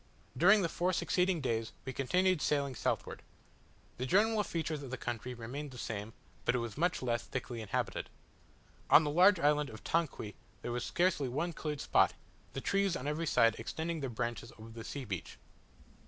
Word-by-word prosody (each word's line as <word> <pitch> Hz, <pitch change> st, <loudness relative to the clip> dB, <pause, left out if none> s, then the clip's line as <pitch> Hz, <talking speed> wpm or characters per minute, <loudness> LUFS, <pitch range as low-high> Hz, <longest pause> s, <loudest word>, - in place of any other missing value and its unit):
During 195 Hz, +9 st, +6 dB
the -, -, +2 dB
four 180 Hz, +3 st, 0 dB
succeeding 180 Hz, -1 st, +1 dB
days 115 Hz, -4 st, -1 dB
we 130 Hz, -, -4 dB
continued 180 Hz, +6 st, +2 dB
sailing 140 Hz, -2 st, +1 dB
southward. -, -, -2 dB, 0.8 s
The 125 Hz, -, -2 dB
general 215 Hz, -, +4 dB
features 160 Hz, -5 st, -3 dB
of 135 Hz, -, -7 dB
the 130 Hz, -, -4 dB
country 120 Hz, +1 st, -4 dB
remained 130 Hz, +6 st, -6 dB
the 130 Hz, -, -11 dB
same, 110 Hz, -1 st, -4 dB, 0.3 s
but 120 Hz, -, +2 dB
it -, -, +3 dB
was 115 Hz, -3 st, -4 dB
much 165 Hz, -2 st, 0 dB
less 120 Hz, -1 st, 0 dB
thickly 125 Hz, -2 st, -5 dB
inhabited. 110 Hz, -, -2 dB, 0.8 s
On 160 Hz, -, +8 dB
the 150 Hz, -, -1 dB
large 185 Hz, +3 st, +6 dB
island 150 Hz, -1 st, +3 dB
of 110 Hz, -, -10 dB
Tanqui 155 Hz, -10 st, -1 dB, 0.3 s
there 120 Hz, -, -3 dB
was 120 Hz, 0 st, -2 dB
scarcely 170 Hz, -7 st, +1 dB
one 160 Hz, +7 st, -1 dB
cleared 150 Hz, -2 st, -4 dB
spot, -, -, +3 dB, 0.4 s
the 135 Hz, -, -4 dB
trees 195 Hz, +1 st, +1 dB
on 130 Hz, -, -5 dB
every 155 Hz, +3 st, -1 dB
side 115 Hz, -5 st, +4 dB
extending 160 Hz, +8 st, -3 dB
their 135 Hz, -3 st, -3 dB
branches 120 Hz, 0 st, -3 dB
over 110 Hz, +1 st, -11 dB
the 115 Hz, 0 st, -8 dB
sea 140 Hz, +3 st, -5 dB
beach. 95 Hz, -6 st, -5 dB
140 Hz, 185 wpm, -33 LUFS, 120-170 Hz, 0.8 s, On